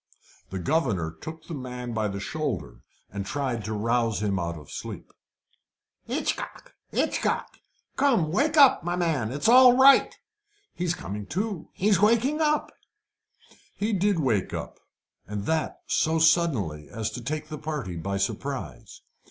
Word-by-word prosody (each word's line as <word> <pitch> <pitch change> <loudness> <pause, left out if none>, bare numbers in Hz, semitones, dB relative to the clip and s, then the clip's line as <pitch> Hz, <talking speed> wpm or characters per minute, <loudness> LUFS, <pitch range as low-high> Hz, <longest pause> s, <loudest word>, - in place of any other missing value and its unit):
The 95 - -5
governor 105 - 0
took 155 - -10
the 170 - -7
man 125 -3 -6
by 110 -1 0
the 100 -1 -4
shoulder, 140 - -4 0.3
and 100 0 -4
tried 125 0 -2
to 110 - -3
rouse 115 -1 0
him 100 -3 0
out 85 -1 -3
of 75 -3 -13
sleep. - - -8 0.9
"Hitchcock! - - -4 0.2
Hitchcock! - - -1 0.4
Come, 235 - +2
wake 295 - +1
up, 280 -3 +7
my 175 +1 -1
man! 155 -11 0
It's 145 +7 -1
all 250 +1 +8
right; 275 +1 +6 0.6
he's 175 -1 -1
coming 100 - -6
to 195 0 -3
he's 200 0 +2
waking 235 +8 +3
up." 300 -1 +1 1.0
He 215 +2 -1
did 200 0 +2
wake 120 - 0
up, - - -7 0.5
and 105 0 -4
that 160 +3 -1
so 160 +1 +1
suddenly 135 - +2
as 110 +1 -3
to 120 - -6
take 155 +4 -4
the 155 -2 -6
party 150 - -4
by 100 +4 -3
surprise. 95 - -4
145 Hz, 145 wpm, -26 LUFS, -, 1.0 s, all